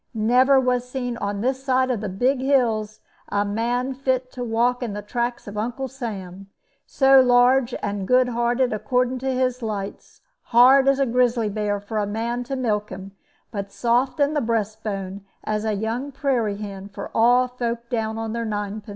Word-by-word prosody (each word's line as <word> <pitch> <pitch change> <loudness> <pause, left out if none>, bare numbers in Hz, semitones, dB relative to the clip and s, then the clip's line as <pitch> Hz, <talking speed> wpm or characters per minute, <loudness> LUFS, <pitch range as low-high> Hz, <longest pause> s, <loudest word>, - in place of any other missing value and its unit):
Never 250 +5 +4
was 250 -1 0
seen 245 -2 -3
on 200 -1 -3
this 260 +2 -1
side 260 -1 +2
of 230 -5 -2
the 210 - -3
big 250 +8 +1
hills 225 -6 +1 0.3
a 205 0 0
man 240 +5 -1
fit 260 -1 -1
to 250 - -5
walk 240 +2 +1
in 235 -4 -3
the 205 0 -5
tracks 240 +2 -3
of 205 +1 -5
Uncle 245 +4 -3
Sam, 195 -7 -7 0.4
so 270 -1 +5
large 245 0 +4
and 200 -2 -3
good 250 0 +4
hearted 240 +1 +1
according 250 +3 0
to 265 +1 -1
his 255 -1 0
lights, 205 -3 -6 0.2
hard 260 +3 +6
as 275 0 +4
a 275 - +2
grizzly 240 -2 +1
bear 205 0 -1
for 210 +2 -4
a 205 - -1
man 230 +4 -2
to 270 +2 -3
milk 210 -5 -1
him, 190 +1 -8 0.4
but 200 -3 -5
soft 240 +7 0
in 285 +1 +2
the 295 - +1
breastbone 210 -3 -3 0.2
as 215 0 -2
a 215 - 0
young 225 +7 -3
prairie 250 -7 -1
hen 200 -1 -7
for 200 0 -8
all 245 +2 +4
folk 235 -1 -4
down 220 -2 -1
upon 225 0 -4
their 235 0 -2
nine 210 -1 -3
pins. 210 - -15
235 Hz, 185 wpm, -23 LUFS, 210-255 Hz, 0.4 s, hard